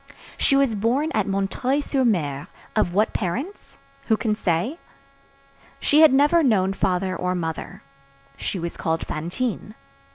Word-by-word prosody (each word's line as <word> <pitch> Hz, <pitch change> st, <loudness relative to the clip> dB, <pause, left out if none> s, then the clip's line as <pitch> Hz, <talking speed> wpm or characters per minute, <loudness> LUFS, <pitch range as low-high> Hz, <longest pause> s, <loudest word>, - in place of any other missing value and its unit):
She 275 Hz, -, +2 dB
was 275 Hz, -4 st, +3 dB
born 245 Hz, +9 st, 0 dB
at 215 Hz, -2 st, 0 dB
M. 195 Hz, 0 st, 0 dB, 0.3 s
sur 280 Hz, -2 st, -1 dB
M. 150 Hz, -, 0 dB, 0.3 s
Of 175 Hz, -, +2 dB
what 210 Hz, +4 st, +1 dB
parents? 255 Hz, -, -4 dB, 0.3 s
Who 220 Hz, -, +3 dB
can 220 Hz, -2 st, 0 dB
say? 210 Hz, -, -1 dB, 1.0 s
She 295 Hz, -, +3 dB
had 315 Hz, -, +8 dB
never 290 Hz, +5 st, +4 dB
known 195 Hz, -9 st, +2 dB
father 185 Hz, -1 st, 0 dB
or 180 Hz, 0 st, -1 dB
mother. 165 Hz, -2 st, -5 dB, 0.5 s
She 195 Hz, -, -4 dB
was 170 Hz, -1 st, -5 dB
called 165 Hz, 0 st, -1 dB
Fantine. 210 Hz, +7 st, -4 dB
210 Hz, 140 wpm, -23 LUFS, 180-265 Hz, 1.0 s, had